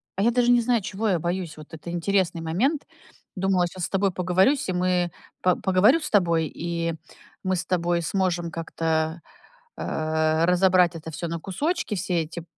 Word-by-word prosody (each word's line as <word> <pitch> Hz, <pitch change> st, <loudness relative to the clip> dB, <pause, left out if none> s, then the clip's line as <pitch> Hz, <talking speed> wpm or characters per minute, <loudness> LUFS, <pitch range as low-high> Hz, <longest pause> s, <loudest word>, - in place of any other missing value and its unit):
а, 195 Hz, -, -1 dB
я 230 Hz, -, +4 dB
даже 245 Hz, 0 st, +3 dB
не 245 Hz, -1 st, +5 dB
знаю, 235 Hz, -1 st, +1 dB
чего 210 Hz, +4 st, -2 dB
я 185 Hz, -, +2 dB
боюсь. 175 Hz, -2 st, -3 dB
Вот 155 Hz, +1 st, -13 dB
это 160 Hz, +2 st, -8 dB
интересный 175 Hz, 0 st, 0 dB
момент. 230 Hz, -, 0 dB, 0.5 s
Думала, 190 Hz, -1 st, +2 dB
щас 175 Hz, 0 st, -4 dB
с -, -, -6 dB
тобой 195 Hz, 0 st, +1 dB
поговорюсь, 185 Hz, +9 st, +2 dB
и -, -, 0 dB
мы 180 Hz, -1 st, +1 dB, 0.3 s
по 180 Hz, -1 st, +3 dB
поговорю 200 Hz, -, +4 dB
с 300 Hz, -, -5 dB
тобой, 170 Hz, -5 st, +3 dB
и 170 Hz, 0 st, -2 dB, 0.5 s
мы 185 Hz, 0 st, +1 dB
с 175 Hz, -1 st, -3 dB
тобой 175 Hz, -1 st, 0 dB
сможем 175 Hz, -2 st, -1 dB
как-то, 160 Hz, 0 st, -1 dB, 0.6 s
а, 160 Hz, +1 st, 0 dB
разобрать 180 Hz, -1 st, +4 dB
это 160 Hz, 0 st, -7 dB
всё 170 Hz, +2 st, -4 dB
на 165 Hz, 0 st, -4 dB
кусочки, 295 Hz, -, -2 dB
все 180 Hz, -2 st, 0 dB
эти 165 Hz, +2 st, -8 dB
180 Hz, 175 wpm, -25 LUFS, 165-195 Hz, 0.6 s, не